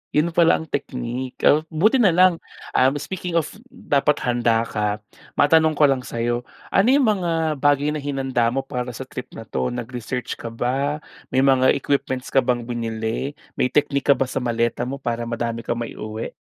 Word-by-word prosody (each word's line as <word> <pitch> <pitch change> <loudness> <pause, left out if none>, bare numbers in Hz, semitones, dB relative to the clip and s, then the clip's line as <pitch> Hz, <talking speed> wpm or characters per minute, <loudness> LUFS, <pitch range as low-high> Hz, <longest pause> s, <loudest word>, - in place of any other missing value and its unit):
Yun 150 +3 +3
pala 170 -1 +5
ang 160 - -8
technique, 125 -2 -4
at 150 +2 +5
buti 190 - +3
na 200 -6 +5
lang. 180 +1 +5 0.4
Um, 135 +3 +3
speaking 175 +2 -2
of 160 - -3 0.2
dapat 145 - +1
handa 115 -2 +1
ka, 105 -1 -1 0.4
matanong 160 +2 +5
ko 150 - +6
lang 135 -2 0
sa'yo. 120 0 -2 0.2
Ano 195 +3 +3
yung 275 -2 +4
mga 165 -6 +1
bagay 145 +1 +2
na 150 - -3
hinanda 135 -4 0
mo 135 - -1
para 125 -2 -4
sa 130 +2 -8
trip 125 - -8
na 115 - -10
'to, 65 -10 -2
nag-research 125 +1 -4
ka 115 - -7
ba, 135 +6 -1 0.3
may 130 - +2
mga 130 -1 +5
equipments 135 -2 -1
ka 135 - +2
bang 120 -1 -1
binili, 115 +2 -3 0.2
may 125 - 0
technique 145 -1 +2
ka - - +6
ba 135 - 0
sa 125 - -3
maleta 120 0 0
mo 135 +3 -4
para 120 -2 -2
madami 115 0 -3
kang 120 - -2
maiuwi? 110 -1 -5
130 Hz, 180 wpm, -22 LUFS, 120-150 Hz, 0.4 s, ko